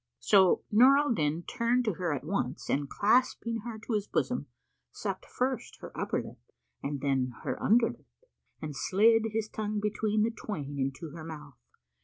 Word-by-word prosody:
So 190 Hz, -3 st, +4 dB
Nur 255 Hz, +6 st, +7 dB
al 290 Hz, -3 st, +2 dB
Din 155 Hz, -2 st, 0 dB
turned 245 Hz, +3 st, +1 dB
to 215 Hz, -, +1 dB
her 175 Hz, -1 st, -2 dB
at 140 Hz, -3 st, -2 dB
once 150 Hz, -5 st, -2 dB
and 140 Hz, 0 st, 0 dB
clasping 230 Hz, +1 st, +2 dB
her 225 Hz, 0 st, -6 dB
to 235 Hz, -, -2 dB
his 210 Hz, -1 st, 0 dB
bosom, -, -, -1 dB, 0.4 s
sucked -, -, -5 dB
first 255 Hz, 0 st, -2 dB
her -, -, -10 dB
upper -, -, -1 dB
lip -, -, -11 dB, 0.4 s
and 140 Hz, -1 st, -3 dB
then 130 Hz, -2 st, 0 dB
her -, -, -3 dB
under 230 Hz, +2 st, +5 dB
lip -, -, -17 dB, 0.5 s
and 150 Hz, -2 st, -6 dB
slid 225 Hz, -, +4 dB
his 220 Hz, 0 st, -1 dB
tongue 215 Hz, -1 st, -3 dB
between 210 Hz, 0 st, 0 dB
the 230 Hz, -, +1 dB
twain 145 Hz, -11 st, -5 dB
into 135 Hz, +4 st, -3 dB
her 160 Hz, +1 st, -8 dB
mouth. 150 Hz, -4 st, -9 dB
205 Hz, 175 wpm, -30 LUFS, 150-225 Hz, 0.5 s, Nur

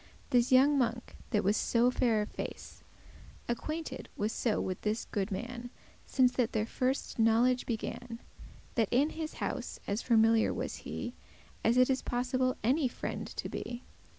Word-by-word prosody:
*constantly -, -, -25 dB
This 245 Hz, +3 st, 0 dB
younge 275 Hz, +2 st, +6 dB
monk, 240 Hz, -1 st, -1 dB
that 210 Hz, -4 st, +1 dB
was 205 Hz, +2 st, +3 dB
so 240 Hz, +2 st, +3 dB
fair 230 Hz, -4 st, +2 dB
of 210 Hz, -, -7 dB
face, -, -, -7 dB, 0.6 s
Acquainted 300 Hz, +3 st, -4 dB
was 210 Hz, +2 st, 0 dB
so 225 Hz, -2 st, 0 dB
with 185 Hz, -1 st, -3 dB
this 215 Hz, +2 st, -1 dB
goode 200 Hz, 0 st, -2 dB
man, 245 Hz, +4 st, -5 dB, 0.4 s
Since 255 Hz, -2 st, +4 dB
that 245 Hz, -3 st, 0 dB
their 215 Hz, -1 st, +1 dB
firste 255 Hz, +2 st, -2 dB
knowledge 235 Hz, +3 st, +3 dB
began, 230 Hz, 0 st, -4 dB, 0.5 s
That 225 Hz, -4 st, +1 dB
in 280 Hz, +6 st, +3 dB
his 315 Hz, -1 st, -5 dB
house -, -, -4 dB
as 205 Hz, +3 st, -1 dB
familiar 225 Hz, -1 st, +4 dB
was -, -, -3 dB
he -, -, -5 dB, 0.5 s
As 235 Hz, +2 st, +3 dB
it 255 Hz, 0 st, +6 dB
is 260 Hz, -, 0 dB
possible 255 Hz, +1 st, 0 dB
any 265 Hz, +5 st, +3 dB
friend 240 Hz, -, -4 dB
to -, -, -5 dB
be. 240 Hz, +1 st, -5 dB
240 Hz, 165 wpm, -31 LUFS, 225-255 Hz, 0.6 s, younge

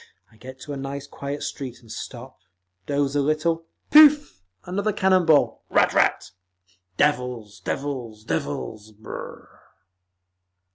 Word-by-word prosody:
I -, -, -22 dB
get 130 Hz, +3 st, -11 dB
to 145 Hz, -, -6 dB
a -, -, -5 dB
nice 135 Hz, +1 st, -5 dB
quiet 140 Hz, +1 st, -6 dB
street 130 Hz, -3 st, -6 dB
and 115 Hz, -2 st, -15 dB
stop, 130 Hz, +1 st, -8 dB, 0.5 s
doze 140 Hz, -1 st, 0 dB
a 145 Hz, -, +3 dB
little, 165 Hz, +3 st, 0 dB, 0.2 s
pooff! 295 Hz, -, +7 dB, 0.2 s
another 200 Hz, +4 st, -1 dB
cannon 190 Hz, -3 st, +2 dB
ball, 155 Hz, -2 st, +3 dB
ratt -, -, +4 dB
ratt…. -, -, +2 dB, 0.7 s
Devils! 125 Hz, -8 st, 0 dB
Devils! 120 Hz, -1 st, -4 dB
Devils! 110 Hz, -1 st, -4 dB
Brrr!" 110 Hz, +1 st, -10 dB
140 Hz, 125 wpm, -24 LUFS, 120-160 Hz, 0.7 s, pooff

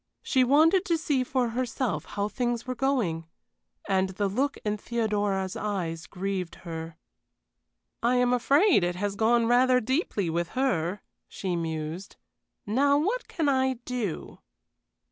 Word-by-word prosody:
She 260 Hz, -2 st, +3 dB
wanted 315 Hz, +8 st, +5 dB
to 335 Hz, -, +1 dB
see 290 Hz, -5 st, 0 dB
for 255 Hz, -2 st, 0 dB
herself 250 Hz, 0 st, -2 dB
how 200 Hz, 0 st, -2 dB
things 240 Hz, +1 st, -2 dB
were 255 Hz, -, -2 dB
going. 235 Hz, -11 st, 0 dB, 0.6 s
And 190 Hz, -1 st, +2 dB
the 200 Hz, +2 st, -1 dB
look 265 Hz, +9 st, -1 dB
in 210 Hz, 0 st, 0 dB
Theodora's 205 Hz, -4 st, -1 dB
eyes 175 Hz, -5 st, -3 dB
grieved 190 Hz, -2 st, -3 dB
her. 165 Hz, -1 st, -6 dB, 1.0 s
"I 240 Hz, +2 st, +2 dB
am 250 Hz, 0 st, +3 dB
afraid 280 Hz, -, +4 dB
it 175 Hz, 0 st, 0 dB
has 200 Hz, +2 st, -2 dB
gone 230 Hz, +2 st, +3 dB
rather 250 Hz, +2 st, +4 dB
deeply 250 Hz, -, -1 dB
with 170 Hz, +1 st, -1 dB
her," 200 Hz, -8 st, 0 dB, 0.3 s
she 185 Hz, -3 st, -3 dB
mused. 165 Hz, +2 st, -4 dB, 0.5 s
"Now 280 Hz, +7 st, +3 dB
what 415 Hz, +12 st, -1 dB
can 320 Hz, -4 st, -1 dB
I 265 Hz, -1 st, +2 dB
do?" 235 Hz, -9 st, -4 dB
225 Hz, 140 wpm, -27 LUFS, 190-260 Hz, 1.0 s, wanted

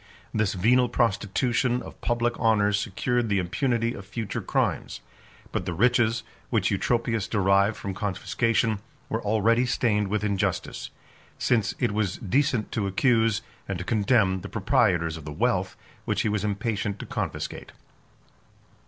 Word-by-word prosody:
This 110 Hz, -3 st, +1 dB
venal 120 Hz, +6 st, +3 dB
prostitution 120 Hz, +3 st, +1 dB
of -, -, -12 dB
public 120 Hz, 0 st, +1 dB
honors 105 Hz, -2 st, +3 dB
secured 115 Hz, +4 st, -1 dB
the 100 Hz, -, +2 dB
impunity 115 Hz, +6 st, 0 dB
of 100 Hz, -, -8 dB
future 105 Hz, +1 st, -4 dB
crimes; -, -, -1 dB, 0.5 s
but -, -, -3 dB
the 90 Hz, -, -2 dB
riches, 115 Hz, +2 st, +3 dB, 0.3 s
which -, -, +1 dB
Eutropius 115 Hz, -3 st, 0 dB
derived 100 Hz, 0 st, +2 dB
from 100 Hz, -, -4 dB
confiscation, 110 Hz, +2 st, 0 dB, 0.3 s
were 110 Hz, -, -1 dB
already 110 Hz, +3 st, +2 dB
stained 105 Hz, -4 st, +1 dB
with 105 Hz, +2 st, -1 dB
injustice; 100 Hz, -2 st, -1 dB, 0.5 s
since 115 Hz, -4 st, +1 dB
it 125 Hz, -, +1 dB
was 100 Hz, -3 st, -1 dB
decent 125 Hz, 0 st, 0 dB
to 105 Hz, -3 st, -1 dB
accuse, 115 Hz, +1 st, +2 dB, 0.2 s
and 100 Hz, -, -2 dB
to 90 Hz, -, -5 dB
condemn, 105 Hz, -3 st, +2 dB
the -, -, -7 dB
proprietors 85 Hz, -2 st, +1 dB
of 80 Hz, -, -10 dB
the 75 Hz, -, -6 dB
wealth, 95 Hz, +1 st, 0 dB, 0.3 s
which -, -, 0 dB
he 110 Hz, -, 0 dB
was 105 Hz, -1 st, -1 dB
impatient 105 Hz, 0 st, -1 dB
to -, -, -7 dB
confiscate. -, -, -4 dB
110 Hz, 145 wpm, -26 LUFS, 100-115 Hz, 0.5 s, venal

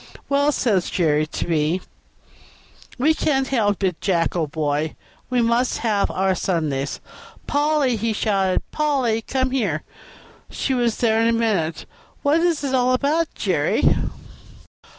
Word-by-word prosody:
"Well," 285 Hz, +1 st, +3 dB
says 210 Hz, -9 st, +1 dB
Jerry 155 Hz, -3 st, +1 dB
to -, -, -4 dB
me, 160 Hz, +1 st, +1 dB, 1.2 s
"we 295 Hz, +6 st, +3 dB
can't 270 Hz, -4 st, 0 dB
help 205 Hz, -6 st, +1 dB
it, 180 Hz, -4 st, -1 dB
Jack, 170 Hz, -4 st, +1 dB
old 160 Hz, -4 st, -1 dB
boy; 150 Hz, 0 st, -1 dB, 0.3 s
we 250 Hz, -1 st, +2 dB
must 235 Hz, +2 st, +1 dB
have 210 Hz, -3 st, +1 dB
our 190 Hz, 0 st, +1 dB
Sundays." 155 Hz, -7 st, -2 dB, 0.5 s
"Polly!" 290 Hz, -4 st, +1 dB
he 225 Hz, +2 st, -1 dB
shouted, 195 Hz, -3 st, 0 dB
"Polly! 270 Hz, -7 st, +1 dB
come 260 Hz, +2 st, -1 dB
here." 200 Hz, -, -1 dB, 0.7 s
She 270 Hz, -, -2 dB
was 240 Hz, -3 st, +1 dB
there 225 Hz, -2 st, +2 dB
in 230 Hz, -, +3 dB
a -, -, +3 dB
minute. 175 Hz, -9 st, 0 dB, 0.4 s
"What 295 Hz, +3 st, +3 dB
is 335 Hz, -4 st, +1 dB
it 270 Hz, -2 st, -2 dB
all 255 Hz, 0 st, +3 dB
about, 300 Hz, +6 st, +1 dB
Jerry?" -, -, 0 dB
225 Hz, 140 wpm, -22 LUFS, 175-265 Hz, 1.2 s, Well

